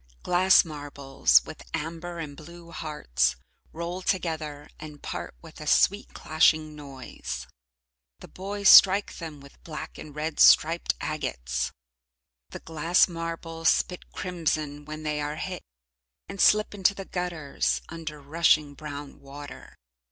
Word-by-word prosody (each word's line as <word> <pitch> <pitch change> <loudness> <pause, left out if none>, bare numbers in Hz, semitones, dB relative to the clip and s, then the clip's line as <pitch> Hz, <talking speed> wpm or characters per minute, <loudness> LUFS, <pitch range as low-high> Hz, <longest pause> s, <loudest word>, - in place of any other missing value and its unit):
Glass 185 +1 +5
marbles, 140 - +2
with - - -10
amber 170 +2 -5
and 150 -4 -6
blue 170 +3 -13
hearts, 65 - -1 0.4
roll 170 +3 -5
together 160 -6 -2
and 150 -1 -10
part - - -6
with - - -12
a - - -7
sweet - - +3
clashing 155 -1 +2
noise. 140 -3 -7 0.7
The - - -11
boys 200 +1 -3
strike 195 +2 +7
them 155 -4 -8
with 140 0 -17
black 155 -2 -8
and 150 -2 -10
red 155 0 -4
striped 165 +2 +5
agates. - - -3 0.8
The - - -9
glass 165 +2 +3
marbles 165 -1 -2
spit 180 - -1
crimson 155 -4 -3
when 155 +1 -7
they 150 -1 -2
are 145 +1 -3
hit, - - -5 0.7
and 195 - -4
slip 210 0 +4
into 200 0 +2
the 195 - -7
gutters 175 -6 -2
under 155 -2 -7
rushing 150 0 +2
brown 145 -1 -8
water. 145 +1 -11
155 Hz, 130 wpm, -26 LUFS, 145-170 Hz, 0.8 s, strike